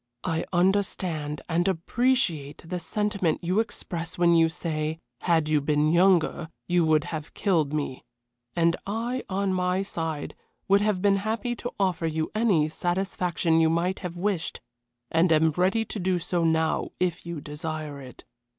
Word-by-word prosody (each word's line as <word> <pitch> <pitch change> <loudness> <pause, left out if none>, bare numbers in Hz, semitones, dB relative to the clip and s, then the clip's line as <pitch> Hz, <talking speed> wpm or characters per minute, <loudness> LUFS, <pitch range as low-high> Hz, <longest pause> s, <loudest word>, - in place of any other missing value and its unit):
I 165 -2 -1
understand 175 -5 0
and 175 +2 +1
appreciate 185 - 0
the 180 +2 -3
sentiment 200 -3 -1
you 180 +5 +1
express 175 -6 -3
when 175 -1 +4
you 165 -1 +5
say, 160 -2 -3 0.2
had 165 -3 +2
you 155 -1 +2
been 150 +1 +2
younger 175 -2 +3 0.2
you 175 -1 +3
would 155 -1 +3
have 155 -1 -6
killed 165 -8 +1
me, 145 -4 -3 0.5
and 170 0 +3
I 235 +5 -2
on 195 0 0
my 180 +1 +1
side 160 -6 -4 0.3
would 200 +1 +5
have 205 -3 0
been 200 -1 +4
happy 225 +4 -2
to 245 - -5
offer 180 -4 +1
you 160 0 -2
any 210 -9 +3
satisfaction 175 -1 0
you 160 - +4
might 175 +3 0
have 180 -2 -6
wished, 185 -2 -1 0.5
and 165 +1 +3
am 160 0 +4
ready 190 +7 +1
to 215 - -5
do 185 0 +1
so 175 0 -1
now 160 -1 +1
if 180 -1 0
you 170 -2 -5
desire 150 0 -5
it. 130 -2 -12
175 Hz, 160 wpm, -26 LUFS, 160-190 Hz, 0.5 s, you